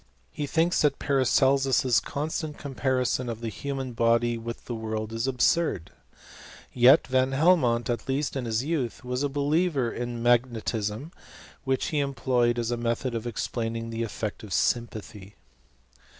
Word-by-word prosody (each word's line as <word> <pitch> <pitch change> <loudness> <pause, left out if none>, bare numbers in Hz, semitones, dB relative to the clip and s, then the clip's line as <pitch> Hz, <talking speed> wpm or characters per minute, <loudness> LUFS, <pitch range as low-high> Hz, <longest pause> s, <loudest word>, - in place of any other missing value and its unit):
He 145 - -4
thinks 165 +4 +2
that 145 -2 +2
Paracelsus's 135 -2 +3
constant 150 +1 -4
comparison 130 -3 -1
of 115 -1 -4
the 115 -1 -4
human 135 +2 -5
body 115 +1 +2
with 115 0 -7
the 120 - -5
world 110 -1 -4
is 115 +3 -1
absurd. 135 - +1 0.8
Yet 130 +5 +6
Van 130 +1 +1
Helmont, 135 -6 +3
at 120 +1 -3
least 140 +2 -1
in 130 -2 -2
his 115 +1 0
youth, 140 -7 -2
was 125 +1 -2
a 145 - 0
believer 145 -2 +1
in 120 -1 -4
magnetism, 120 +1 0 0.5
which 130 -1 0
he 150 - 0
employed 125 -3 +1
as 120 0 -1
a 120 - -1
method 120 +2 -1
of 115 0 -3
explaining 115 0 -3
the 115 0 -3
efiect 110 -2 -4
of 105 -4 -7
sympathy. 105 -4 -2
125 Hz, 150 wpm, -27 LUFS, 115-140 Hz, 0.8 s, Yet